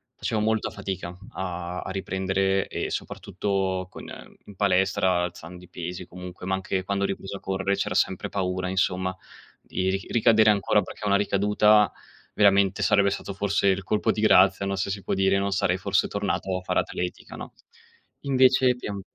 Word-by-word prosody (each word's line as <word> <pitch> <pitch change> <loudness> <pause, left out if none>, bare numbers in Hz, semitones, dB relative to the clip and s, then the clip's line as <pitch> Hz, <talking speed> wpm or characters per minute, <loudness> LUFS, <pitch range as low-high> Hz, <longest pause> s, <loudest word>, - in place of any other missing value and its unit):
facevo 110 -2 -2
molta 110 0 0
fatica 90 -2 -6 0.2
a 90 -1 -4
a - - -6
riprendere 95 0 0
e - - -3
soprattutto 95 -1 -2
con - - -10
ehm, - - -11
in 100 - -12
palestra, 95 -2 +2
alzando 90 +1 -7
i 90 - -16
pesi 90 +1 -6
comunque, 90 0 -10
ma 95 - 0
anche 95 0 -2
quando 100 +1 -1
ho - - 0
ripreso 95 0 -5
a - - -14
correre 95 +1 -1
c'era 100 - -2
sempre - - 0
paura 95 -1 -2
insomma 95 0 0 0.5
di 95 0 -2
ri 95 0 -3
ricadere 110 -2 +4
ancora 105 +1 +2
perché 105 - -8
una 100 -1 +3
ricaduta 105 +1 +3 0.4
veramente 100 -1 +3
sarebbe 100 -1 +4
stato 100 - -5
forse 100 0 0
il 95 0 +2
colpo 105 +2 +1
di - - -4
grazia, 100 -2 +5
no 100 - -1
se 95 +1 -2
si 100 0 -5
può - - -2
dire, 95 0 +2
non 100 0 -1
sarei 95 -1 +1
forse 95 - +1
tornato 95 -1 -2
a - - -6
fare 90 - 0
atletica, 90 0 -4
no, - - -9 0.7
invece 130 -2 +4
piem 100 -5 -6
95 Hz, 180 wpm, -25 LUFS, 95-100 Hz, 0.7 s, grazia